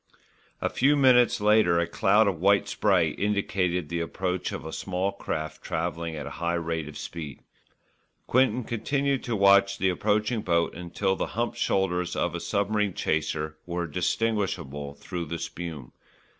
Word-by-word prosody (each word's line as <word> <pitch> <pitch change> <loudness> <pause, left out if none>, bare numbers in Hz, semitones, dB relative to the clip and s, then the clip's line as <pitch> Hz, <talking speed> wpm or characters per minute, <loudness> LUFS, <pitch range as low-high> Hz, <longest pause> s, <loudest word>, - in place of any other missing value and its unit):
A - - +1
few 140 +3 +3
minutes 125 -5 +5
later 105 -4 +4
a 85 - +2
cloud 100 +5 +3
of 95 -5 -1
white 100 +3 +3
spray 95 -6 +2
indicated 90 -3 -1
the 85 +2 -3
approach 90 +2 -2
of - - -6
a 80 - -6
small 95 +1 -2
craft 80 -3 -5
travelling 85 0 -3
at 75 -2 -5
a - - -5
high 85 0 +1
rate 80 -2 -2
of 75 - -9
speed. 80 -5 -7 0.8
Quinton 125 -1 +2
continued 135 +4 -1
to 120 - -1
watch 100 -1 +5
the 95 - +2
approaching 105 +4 0
boat 85 -2 +1
until 90 +3 -1
the - - -2
humped 120 0 -1
shoulders 90 -2 0
of 85 - 0
a 85 - -3
submarine 100 0 0
chaser 75 0 -1
were 85 0 -2
distinguishable 85 -6 -2
through 85 +3 -5
the 85 +2 -4
spume. 80 -7 -6
90 Hz, 155 wpm, -27 LUFS, 85-105 Hz, 0.8 s, minutes